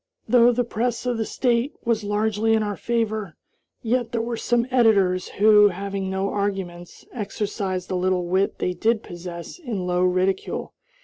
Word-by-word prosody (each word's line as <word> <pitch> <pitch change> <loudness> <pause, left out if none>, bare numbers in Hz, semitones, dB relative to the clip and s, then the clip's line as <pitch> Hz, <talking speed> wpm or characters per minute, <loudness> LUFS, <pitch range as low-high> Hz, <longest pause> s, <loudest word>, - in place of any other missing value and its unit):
Though 245 -1 +6
the 245 +1 +1
press 235 +1 -2
of 245 -2 -1
the 220 - -1
State 245 +2 0
was 230 -2 +1
largely 215 +2 +1
in 220 - +1
our 205 -1 -2
favor, 220 -7 -2 0.5
yet 240 0 0
there 230 -2 0
were 235 0 -3
some 240 +1 +1
editors 200 -7 +3
who, 210 0 +5
having 195 0 -3
no 190 +1 -1
arguments, 190 -4 -4
exercised 200 -4 -3
the 185 - -3
little 180 0 0
wit 185 +3 0
they 180 - -1
did 220 +5 +1
possess 175 - -8
in 225 - -4
low 180 0 0
ridicule. 185 +1 0
205 Hz, 165 wpm, -23 LUFS, 185-230 Hz, 0.5 s, Though